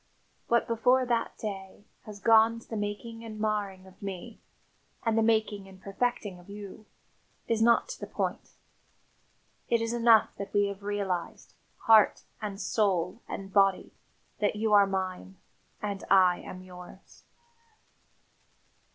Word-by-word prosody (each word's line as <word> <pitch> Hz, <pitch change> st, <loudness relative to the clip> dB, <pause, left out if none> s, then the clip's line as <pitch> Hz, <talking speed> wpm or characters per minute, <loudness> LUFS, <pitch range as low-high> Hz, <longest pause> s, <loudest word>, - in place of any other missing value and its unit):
What, 235 Hz, 0 st, +3 dB
before 250 Hz, +3 st, +3 dB
that 235 Hz, -2 st, -1 dB
day, 195 Hz, -1 st, -7 dB, 0.2 s
has 210 Hz, -1 st, -9 dB
gone 225 Hz, +1 st, +5 dB
to -, -, -19 dB
the 225 Hz, -, -6 dB
making 215 Hz, +2 st, -5 dB
and 215 Hz, -2 st, -8 dB
marring 205 Hz, -3 st, -2 dB
of 190 Hz, 0 st, -18 dB
me, 200 Hz, +3 st, -7 dB, 0.7 s
and 225 Hz, -1 st, +2 dB
the 225 Hz, -, +3 dB
making 220 Hz, -3 st, +1 dB
and 190 Hz, -1 st, -14 dB
perfecting 200 Hz, -1 st, -2 dB
of 175 Hz, -, -17 dB
you, 205 Hz, +1 st, -10 dB, 0.6 s
is 225 Hz, -1 st, 0 dB
not 235 Hz, -, +4 dB
to -, -, -7 dB
the -, -, -6 dB
point. -, -, -4 dB, 1.1 s
It 235 Hz, -, +3 dB
is 230 Hz, +1 st, -2 dB
enough 230 Hz, -2 st, +4 dB
that 200 Hz, -, -7 dB
we 205 Hz, 0 st, +4 dB
have 200 Hz, 0 st, -8 dB
realised, 200 Hz, -4 st, -3 dB, 0.3 s
heart, 220 Hz, -2 st, +5 dB, 0.2 s
and 205 Hz, -2 st, -5 dB
soul, 195 Hz, -1 st, 0 dB
and 195 Hz, -1 st, -7 dB
body, 195 Hz, -2 st, +3 dB, 0.5 s
that 210 Hz, 0 st, +1 dB
you 215 Hz, 0 st, 0 dB
are 200 Hz, -1 st, +7 dB
mine 190 Hz, 0 st, -4 dB, 0.5 s
and 200 Hz, -2 st, -3 dB
I 185 Hz, -2 st, +5 dB
am 185 Hz, 0 st, -9 dB
yours." 180 Hz, +1 st, -14 dB
205 Hz, 145 wpm, -29 LUFS, 195-225 Hz, 1.1 s, are